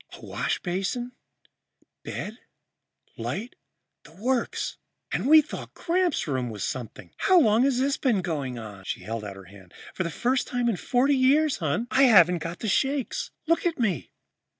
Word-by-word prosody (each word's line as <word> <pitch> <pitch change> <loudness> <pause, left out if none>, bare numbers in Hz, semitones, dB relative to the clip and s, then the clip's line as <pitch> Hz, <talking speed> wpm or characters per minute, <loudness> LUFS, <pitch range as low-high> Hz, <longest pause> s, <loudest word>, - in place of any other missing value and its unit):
Washbasin, 195 +7 -2 0.9
bed, 220 +3 -6 0.8
light 225 +5 -4 0.5
the 150 - -17
works. 240 +7 -1 0.3
And - - -1
we 310 +1 +8
thought - - -8
Gramps' 350 - 0
room 130 -4 -1
was 105 -3 -5
something. 115 -8 -5
How 370 -1 +5
long 220 -6 +4
has 270 -3 +2
this 270 +1 +1
been 225 -9 +1
going 140 -8 -3
on?" 105 -4 -9
She - - -4
held 115 0 -5
out 100 -2 -7
her 95 - -11
hand. 95 -1 -16 0.2
"For - - -4
the 170 - -1
first 250 - 0
time 245 -1 -1
in 215 - 0
forty 265 +7 +2
years, 280 +3 +3
hon, 160 +8 -1
I 275 +1 +5
haven't 180 -7 +6
got 165 +2 -6
the 220 - -2
shakes 270 +5 0 0.2
look 335 +1 +2
at 335 - -2
me!" 195 - -1
215 Hz, 165 wpm, -26 LUFS, -, 0.9 s, we